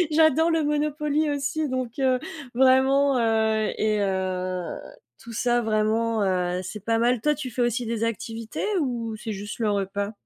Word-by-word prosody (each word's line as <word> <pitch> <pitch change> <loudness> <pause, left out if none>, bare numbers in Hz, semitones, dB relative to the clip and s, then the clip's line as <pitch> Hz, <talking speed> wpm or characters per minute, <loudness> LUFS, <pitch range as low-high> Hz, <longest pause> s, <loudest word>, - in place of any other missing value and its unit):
J'adore 315 +1 +4
le 325 -2 +1
Monopoly 300 0 0
aussi 285 +2 -1
donc, 255 -2 -3
heu, 260 -2 +2 0.4
vraiment, 265 +1 +4
heu 220 -1 +2
et 215 -1 +1
heu, 185 -2 -1 0.6
tout 235 - -10
ça 240 +2 +1
vraiment, 220 0 +1
heu, 180 -2 0
c'est 195 +2 -8
pas 230 0 +1
mal. 240 +1 +2
Toi, 300 +5 +2
tu 270 -3 -6
fais 245 - -4
aussi 240 +1 0
des 230 0 -1
activités 225 0 -4 0.2
ou 235 -5 -2
c'est 220 0 -5
juste 205 +1 -6
le 220 -3 +1
repas? 200 +1 -2
230 Hz, 165 wpm, -25 LUFS, 215-270 Hz, 0.6 s, J'adore